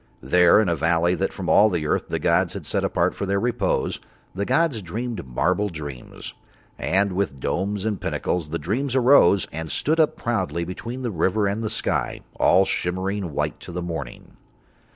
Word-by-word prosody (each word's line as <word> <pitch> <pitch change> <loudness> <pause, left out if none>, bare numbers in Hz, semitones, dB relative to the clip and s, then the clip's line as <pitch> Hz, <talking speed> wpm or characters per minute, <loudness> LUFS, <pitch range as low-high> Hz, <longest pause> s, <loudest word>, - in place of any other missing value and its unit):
There 90 +8 +5
in 110 - +2
a 85 - +1
valley 85 +3 +2
that 95 +1 -1
from 95 -3 -6
all 105 +2 +6
the 85 -5 -2
earth - - 0
the - - -2
gods - - +2
had - - -6
set - - 0
apart - - +1
for 100 - -4
Their 100 0 +1
repose 115 -3 0 0.3
the 100 +2 -2
gods 160 -7 +1
dreamed 110 - -5
marble 90 +11 0
dreams. 75 -7 -8 0.5
And 100 +2 +2
with 90 -8 -2
domes 100 - -2
and 105 -4 -2
pinnacles 85 -4 -2
the 85 - -2
dreams 125 +10 -2
arose 125 -8 +5
and 80 +1 -5
stood 160 +3 0
up 155 -2 +3
proudly 95 -8 -2
between 115 +9 -6
the 120 - -2
river 95 +4 +1
and 100 +3 -1
the 110 - -1
sky, 110 - -1 0.2
all 95 - +5
shimmering 95 -1 -2
white - - -2
to - - -10
the 90 0 -4
morning. 80 -8 -7
95 Hz, 185 wpm, -23 LUFS, 85-110 Hz, 0.5 s, all